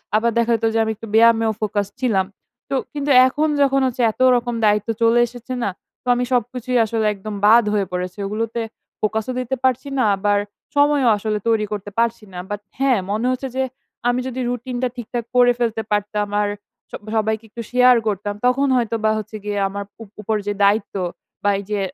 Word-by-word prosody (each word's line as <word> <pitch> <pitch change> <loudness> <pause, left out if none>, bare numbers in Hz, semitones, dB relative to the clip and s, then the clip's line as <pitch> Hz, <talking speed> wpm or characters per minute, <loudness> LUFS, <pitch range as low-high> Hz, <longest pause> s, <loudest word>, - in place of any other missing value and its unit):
আবার 230 +2 +2
দেখা 235 0 +2
যেত 225 0 -1
যে 225 - +2
আমি 220 - -1
একটু 225 +2 -10
ব্যায়ামেও 225 0 +5
ফোকাস 205 -1 -1
ছিলাম। 215 -7 +1 0.4
তো - - -1 0.2
কিন্তু 290 -1 -1 0.2
এখন 295 +4 0
যখন 275 -1 +3
হচ্ছে 250 0 -3
এত 220 - -10
রকম 240 0 -1
দায়িত্ব 210 +1 +2
চলে 230 +1 +4
এসেছে 245 +2 -8
না? - - +1 0.3
তো - - -17
আমি 245 - 0
সবকিছুই 250 +1 0
আসলে 220 0 -1
একদম 210 +1 -7
বাদ 230 +3 +7
হয়ে 205 -2 +1
পড়েছে। 180 +1 -4
এগুলোতে 225 +3 -2 0.4
ফোকাসও 220 +3 -1
দিতে 255 +1 -2
পারছি 260 +2 +1
না, 255 - +3
আবার 205 +1 +1 0.4
সময়ও 285 -3 +4
আসলে 215 +1 -2
তৈরি 220 -2 +2
করতে 205 -1 -4
পারছি 230 -1 0
না। 180 - -7
বাট 205 0 -4 0.2
হ্যাঁ, 265 -5 +3
মনে 215 +3 -1
হচ্ছে 255 +1 -3
যে 265 - +1 0.5
আমি 245 +1 +1
যদি 260 0 -5
রুটিনটা 245 +1 -2
ঠিকঠাক 240 -1 -5
করে 245 0 +6
ফেলতে 230 -2 0
পারতাম 205 0 0
আর 205 - 0 0.4
সব - - -7
সবাইকে 220 0 0
একটু 235 - -7
শেয়ার 250 0 +6
করতাম, 205 0 -1
তখন 265 +3 +3
হয়তোবা 225 -3 +1
হচ্ছে 215 0 -6
গিয়ে 205 -1 -2
আমার 200 +1 -5 0.2
উপ 210 - -15
উপর 215 +1 -1
যে 205 - 0
দায়িত্ব 200 +1 +2 0.5
বা 205 - +3
এই - - -6
যে 210 - 0
225 Hz, 190 wpm, -20 LUFS, 210-250 Hz, 0.5 s, বাদ